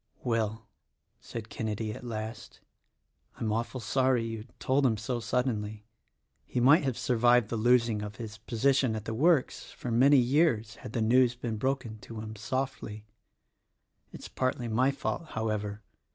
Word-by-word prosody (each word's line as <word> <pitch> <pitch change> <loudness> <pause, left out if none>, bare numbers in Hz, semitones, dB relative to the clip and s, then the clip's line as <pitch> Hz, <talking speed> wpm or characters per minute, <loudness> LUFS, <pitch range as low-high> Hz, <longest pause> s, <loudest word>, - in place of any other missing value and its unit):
"Well," 110 -2 -1 0.5
said 110 -2 -7
Kenedy 110 0 -3
at - - -9
last, 110 -1 -6 0.8
"I'm 110 -2 -2
awful 115 +3 -2
sorry 130 -1 +1
you 115 -1 -5
told 135 +2 +1
him 115 -5 +3
so 120 +3 -2
suddenly. 110 -4 -2 0.6
He - - -3
might 140 +7 +6
have 130 -4 -1
survived 120 -3 +3
the - - -2
losing 115 -1 +3
of 105 0 -6
his 110 0 -8
position 125 +2 +1
at 110 -1 -5
the 110 - -3
works 150 +3 +2
— - - -14
for 125 - -4
many 135 +5 +6
years 125 -4 +2
— - - -17
had 105 - -8
the 115 - 0
news 125 +2 +4
been 120 -3 -4
broken 125 -2 -2
to 115 +1 -9
him 110 0 -7
softly. 115 -2 -4 1.1
It's - - -9
partly 130 -2 -1
my 125 +4 +2
fault, 140 +4 -3
however. 105 -1 -2
115 Hz, 160 wpm, -29 LUFS, 110-130 Hz, 1.1 s, might